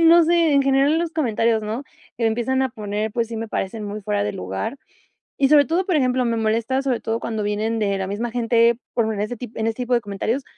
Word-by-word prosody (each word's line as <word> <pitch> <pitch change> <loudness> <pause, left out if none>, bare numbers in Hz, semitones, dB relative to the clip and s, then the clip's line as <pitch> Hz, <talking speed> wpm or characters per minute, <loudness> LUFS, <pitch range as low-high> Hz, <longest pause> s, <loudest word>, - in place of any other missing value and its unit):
no 335 +1 +7
sé, 335 -2 +3
en 280 -1 +4
general 275 +2 +3
en 325 - +2
los 340 -1 -1
comentarios, 230 -7 +1
¿no?, 220 +6 -3 0.3
que 230 -1 +1
empiezan 245 +4 +1
a 260 - +1
poner, 210 -1 -3
pues 230 -1 -1
sí, 230 - -5
me 225 0 -4
parecen 210 +2 -3
muy 205 +1 -5
fuera 105 - -1
de 105 - -2
lugar, 95 - -4 0.6
y 275 -1 +3
sobre 290 -2 +6
todo, 355 +4 0
por 360 - +1
ejemplo, 255 -2 +2
me 230 -1 0
molesta, 230 +4 0
sobre 260 -4 -1
todo 225 +1 -2
cuando 220 -3 -3
vienen 215 +2 -1
de 200 -2 0
la 190 -1 -3
misma 225 +4 -3
gente, 235 -1 +3 0.2
por 220 -2 +1
en 205 - -5
ese 215 +4 -2
tip 235 -1 -9
en 220 0 0
ese 225 - -1
tipo 250 0 -2
de 240 - +4
comentarios, 215 +6 -2
230 Hz, 250 wpm, -22 LUFS, 215-265 Hz, 0.6 s, no